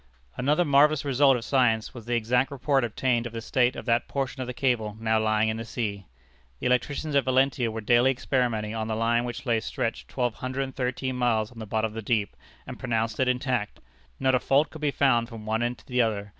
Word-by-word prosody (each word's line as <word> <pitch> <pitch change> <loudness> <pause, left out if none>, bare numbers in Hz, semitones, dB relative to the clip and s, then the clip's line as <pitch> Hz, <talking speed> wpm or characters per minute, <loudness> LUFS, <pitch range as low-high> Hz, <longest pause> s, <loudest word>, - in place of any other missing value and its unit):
Another 150 +7 +2
marvellous 150 +1 +4
result 135 -1 +4
of 115 - -7
science 115 -5 +2
was 120 -3 -11
the 120 - 0
exact 125 +4 +1
report 140 -1 +1
obtained 120 +1 0
of 120 - -11
the 115 - -4
state 125 +2 +1
of - - -7
that 120 0 +1
portion 135 -1 -3
of 130 - -4
the - - -3
cable 115 -5 0
now 110 0 +1
lying 110 0 +2
in 110 0 -1
the 115 - -4
sea. 105 -4 -4 0.5
The - - -6
electricians 140 +4 0
at 140 - +4
Valentia 130 -1 +2
were 110 0 -5
daily 120 +4 +4
experimenting 120 -5 -1
on 110 -1 -3
the 110 - -2
line 120 +2 +1
which 125 +3 -6
lay 115 -3 +2
stretched 115 +1 -3
twelve 125 -3 -1
hundred 130 +3 -3
and 135 -1 -7
thirteen 130 0 -2
miles 115 -3 +1
on 120 - -12
the 110 - -7
bottom 110 +2 0
of - - -14
the 115 - -5
deep, 105 -2 -1 0.3
and - - -8
pronounced 115 -2 -1
it 130 - +2
intact. 125 -4 -1 0.4
Not 130 0 +2
a 130 - +4
fault 140 +5 +2
could 160 - -10
be 150 - +1
found 125 -4 +2
from 115 -3 -9
one 110 +1 0
end 120 +1 -1
to - - -20
the 125 -1 +1
other. 105 -3 -1
120 Hz, 235 wpm, -26 LUFS, 110-130 Hz, 0.5 s, marvellous